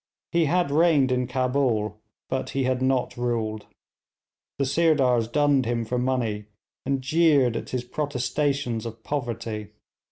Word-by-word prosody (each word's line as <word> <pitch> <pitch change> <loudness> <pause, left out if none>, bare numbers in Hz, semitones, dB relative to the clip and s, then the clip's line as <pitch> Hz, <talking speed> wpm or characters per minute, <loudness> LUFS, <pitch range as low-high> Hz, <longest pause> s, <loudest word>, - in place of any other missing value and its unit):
He 170 -2 +3
had 175 -1 +1
reigned 150 -4 +4
in 125 -1 0
Cabul, 125 -5 0 0.3
but 130 - -2
he 135 - +2
had 130 0 0
not 130 -1 +1
ruled. 115 -3 -2 0.9
The 140 - +1
Sirdars 135 -6 +3
dunned 140 0 +2
him 115 -1 -1
for 125 +3 -1
money, 120 -5 -1 0.4
and 135 -1 0
jeered 145 -5 +3
at - - -4
his 125 -1 -2
protestations 135 -2 -1
of 115 0 -10
poverty. 115 -6 -4
130 Hz, 135 wpm, -25 LUFS, 115-140 Hz, 0.9 s, reigned